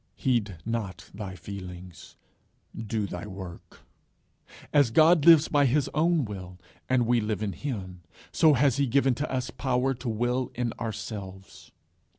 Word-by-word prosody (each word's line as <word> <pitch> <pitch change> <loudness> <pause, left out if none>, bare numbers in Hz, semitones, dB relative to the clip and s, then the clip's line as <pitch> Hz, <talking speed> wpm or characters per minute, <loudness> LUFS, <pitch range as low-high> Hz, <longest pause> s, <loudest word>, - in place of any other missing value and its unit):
Heed 110 -8 0
not 115 -4 -4
thy 100 -2 -7
feelings: 90 -1 -9 0.6
Do 110 -1 -2
thy 90 0 -6
work. 95 -3 -10 0.9
As 145 -5 +5
God 160 +5 +5
lives 165 -2 +8
by 145 -2 +3
his 140 +2 +1
own 160 -1 +2
will, 95 -3 -8 0.3
and 125 -2 +3
we 120 0 +2
live 105 0 -2
in 100 -2 -2
him, 95 -10 -6 0.3
so 160 -2 +5
has 135 0 +3
he 140 -1 +2
given 135 +1 +3
to 145 +5 -4
us 130 -1 -2
power 130 0 0
to 125 -1 -5
will 120 +3 -1
in 120 -1 -2
ourselves. 100 -4 -7
115 Hz, 150 wpm, -27 LUFS, 100-135 Hz, 0.9 s, lives